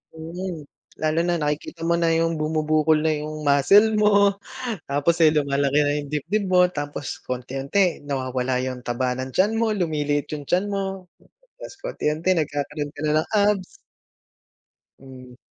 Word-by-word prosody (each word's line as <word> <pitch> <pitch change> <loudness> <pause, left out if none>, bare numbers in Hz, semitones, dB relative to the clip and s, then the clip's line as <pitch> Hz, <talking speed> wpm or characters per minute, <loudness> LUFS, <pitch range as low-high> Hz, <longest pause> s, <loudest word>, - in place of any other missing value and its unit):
Mm. 165 0 -6 0.3
Lalo 155 +1 0
na 175 0 0
nakikita 155 +2 -3
mo 170 - +2
na 170 -1 +2
yung 165 -1 +1
bumubukol 155 0 +2
na 155 - +3
yung 155 0 -5
muscle 200 +11 +5
mo, 200 -1 +5 0.5
tapos 145 +4 +1
eh, 155 - +6
lumalaki 140 -1 +1
na 145 0 +2
yung 145 -1 -5
dibdib 190 +8 -1
mo, 180 0 +6
tapos 145 -4 -6
paunti-unti 135 +8 -1
nawawala 130 -2 -1
yung 130 -1 -5
taba 125 +1 -1
ng 130 0 -5
tiyan 210 +4 +2
mo, 225 -1 +1
lumiliit 150 -6 -1
yung 145 - -9
tiyan 185 +7 0
mo, 195 -2 -4 0.5
tapos - - -9
paunti-unti 160 - -1
nagkakaroon 145 0 -3
ka 145 - -15
na 150 - +1
ng - - -8
abs. 205 -2 +2 1.4
Mm. 130 -2 -13
155 Hz, 150 wpm, -23 LUFS, 140-180 Hz, 1.4 s, eh